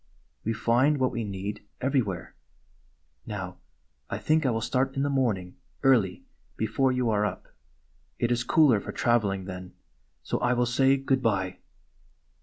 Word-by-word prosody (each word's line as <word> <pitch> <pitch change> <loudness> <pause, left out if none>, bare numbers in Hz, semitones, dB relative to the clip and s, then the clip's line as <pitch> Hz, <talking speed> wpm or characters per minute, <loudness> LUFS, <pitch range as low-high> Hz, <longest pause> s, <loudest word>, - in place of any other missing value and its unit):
"We 115 - 0
find 120 +6 +2
what 130 -1 +1
we 115 - -3
need, 100 0 -5 0.2
everywhere. 125 -9 -1 0.9
Now, - - -5 0.5
I - - -2
think 155 -2 +2
I - - +3
will 115 -2 0
start 130 +3 0
in 135 - 0
the 145 - 0
morning 105 -10 0 0.3
early 115 -9 +3 0.3
before 115 +5 +1
you 125 -2 +1
are 105 -1 +2
up. 105 - -3 0.7
It 120 - 0
is 120 0 +1
cooler 145 -6 +4
for - - -6
traveling 105 -6 +1
then. 90 -1 -8 0.5
So - - -2
I 120 +1 +2
will 125 0 +2
say 135 +3 +3
good 135 -1 0
bye." 95 -5 0
120 Hz, 155 wpm, -27 LUFS, 105-135 Hz, 0.9 s, cooler